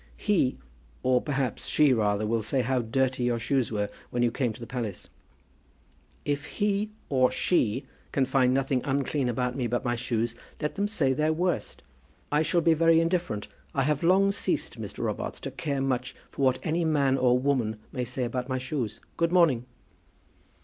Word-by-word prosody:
"He, 190 -11 +1 0.5
or 125 -1 +3
perhaps 135 -5 -2
she 150 -3 +4
rather, 105 -2 +1
will 115 +1 +1
say 130 +5 0
how 130 +2 +1
dirty 125 +2 0
your 120 -1 +1
shoes 125 +1 0
were 105 -2 0 0.2
when 120 0 0
you 120 - +3
came 125 -1 0
to 110 - -11
the 120 - -6
palace." 115 -6 -5 1.2
"If 145 0 -1
he, 205 0 +1 0.2
or 130 -2 +3
she, 130 - +1 0.3
can 135 - +2
find 130 -1 +3
nothing 135 -1 +1
unclean 140 -1 0
about 125 +1 -1
me 125 -3 -1
but 120 +2 -1
my 120 0 +1
shoes, 120 -1 -1 0.3
let 150 -1 -2
them 205 0 0
say 150 -11 +1
their 155 +3 +1
worst. 175 +2 -2 0.5
I 150 +1 +3
shall 170 +2 +2
be 165 0 +5
very 165 +1 +5
indifferent. 165 - 0 0.3
I 135 - +2
have 150 +1 +1
long 190 +3 +4
ceased, 200 - -2
Mr. - - -6
Robarts, - - -3
to - - -5
care 140 -4 -2
much 130 -2 -1 0.2
what 130 -2 +2
any 170 +1 0
man 145 -4 +3
or 125 -2 +4
woman 125 -5 0
may 125 -3 -2
say 125 +1 -3
about 125 +2 -3
my 130 - 0
shoes. 125 -5 -3 0.2
Good 170 0 +2
morning." 155 -10 +4
130 Hz, 180 wpm, -27 LUFS, 120-155 Hz, 1.2 s, be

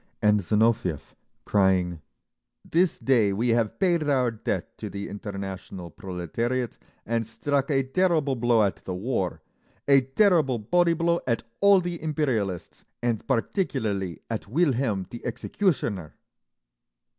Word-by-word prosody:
And 105 0 +4
Zinoviev, 105 -5 +1 0.3
crying, 90 -4 +2 0.6
"This 175 +1 +2
day 115 -7 +3
we 115 +5 0
have 115 -2 +1
paid 175 -4 +2
our 130 -4 +2
debt 110 - -4
to - - -5
the 100 0 -5
international 95 -3 -7
proletariat, 115 +9 -3 0.3
and 115 -1 -1
struck 140 +4 -1
a 135 -2 +2
terrible 155 -1 +1
blow 120 -2 +3
at 95 -4 0
the 90 - -6
war, 95 -3 -2 0.4
a 140 -1 +6
terrible 140 - +3
body 170 +10 +2
blow 170 +1 +1
at 115 -2 0 0.2
all 200 -1 +6
the 175 -1 -4
imperialists 125 - -2 0.2
and 115 -3 -1
particularly 115 - -1
at 115 -3 -4
Wilhelm 125 - +1
the 120 - -8
Executioner…." 120 - -1
120 Hz, 125 wpm, -26 LUFS, 100-145 Hz, 0.6 s, a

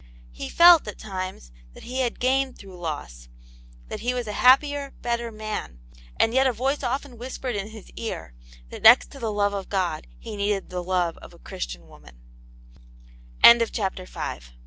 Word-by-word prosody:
He - - -7
felt, 340 -6 +7
at 210 - -6
times, 185 - -6 0.2
that - - -13
he 255 +2 -5
had 245 -2 -1
gained 265 +1 +1
through 195 -2 -12
loss: 65 - -6 0.6
that - - -6
he 250 +2 -1
was 245 -1 -2
a 210 - -5
happier, 280 +4 +3
better 235 -1 -2
man; 215 - -6 0.4
and 225 - +3
yet 265 +1 +4
a - - +2
voice 265 +5 -1
often 255 -1 -3
whispered 255 -1 -5
in 200 0 -3
his 220 -2 -12
ear, 225 - -6 0.4
that - - -8
next 235 +3 +7
to 275 - -11
the 225 -3 -2
love 205 -1 +1
of 195 -1 -5
God 180 -6 -2
he 225 -2 -8
needed 200 -1 -2
the 180 -1 -3
love 175 -2 -1
of - - -14
a - - -17
Christian - - -7
woman, 60 -1 -17 1.5
CHAPTER 190 -4 -3
VI. - - -5
215 Hz, 175 wpm, -24 LUFS, 185-255 Hz, 1.5 s, felt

